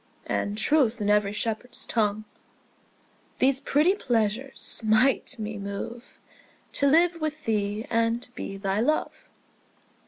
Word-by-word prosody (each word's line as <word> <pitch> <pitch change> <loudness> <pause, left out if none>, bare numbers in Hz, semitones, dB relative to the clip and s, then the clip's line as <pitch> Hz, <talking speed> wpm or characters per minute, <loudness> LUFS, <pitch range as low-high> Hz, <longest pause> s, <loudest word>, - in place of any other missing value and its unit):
And 205 +1 -2
truth 245 -1 +2
in 205 -1 +1
every 210 -1 +3
shepherd's 225 +3 -4
tongue, 215 -2 0 1.1
These 270 0 +3
pretty 300 +7 +3
pleasures 245 - -2
might 235 +4 +3
me 215 -1 -5
move 200 +4 -7 0.5
To 280 - +1
live 335 +3 +3
with 310 0 -3
thee 210 0 -1
and 230 +1 0
be 195 -5 -6
thy 195 +1 -1
love. 305 +7 +1
230 Hz, 120 wpm, -26 LUFS, 210-275 Hz, 1.1 s, every